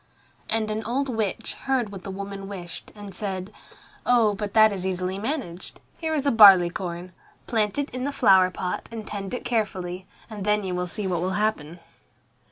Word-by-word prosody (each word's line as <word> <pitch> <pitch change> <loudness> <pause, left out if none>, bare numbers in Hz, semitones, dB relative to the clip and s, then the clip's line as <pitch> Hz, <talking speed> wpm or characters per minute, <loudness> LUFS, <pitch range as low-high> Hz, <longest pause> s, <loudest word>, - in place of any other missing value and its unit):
And 220 -1 0
an 215 +1 -2
old 265 +5 -1
witch 220 -2 -2
heard 260 -6 +1
what 195 -2 -8
the - - -6
woman 195 0 -6
wished, 180 -4 -8
and 205 -2 -9
said, 190 -1 -4 0.5
"Oh, 235 -4 +4
but 205 0 -5
that 220 -1 +7
is 190 -2 -4
easily 185 0 -2
managed. 215 - -5 0.2
Here 320 -1 -2
is 285 -2 -1
a 280 - +4
barley 195 -6 +8
corn. 180 -2 -5 0.3
Plant 215 -1 0
it 285 0 -2
in 255 +2 -3
a - - -1
flower 190 -9 +5
pot 180 0 -4
and 225 -2 -7
tend 195 -2 -5
it - - -7
carefully, 190 -6 -2 0.2
and 215 -3 -7
then 210 0 +2
you 185 -1 -3
will 180 0 -2
see 205 +3 -4
what 180 -3 -1
will 185 +2 -1
happen." 175 -6 -1
200 Hz, 190 wpm, -25 LUFS, 185-225 Hz, 0.5 s, barley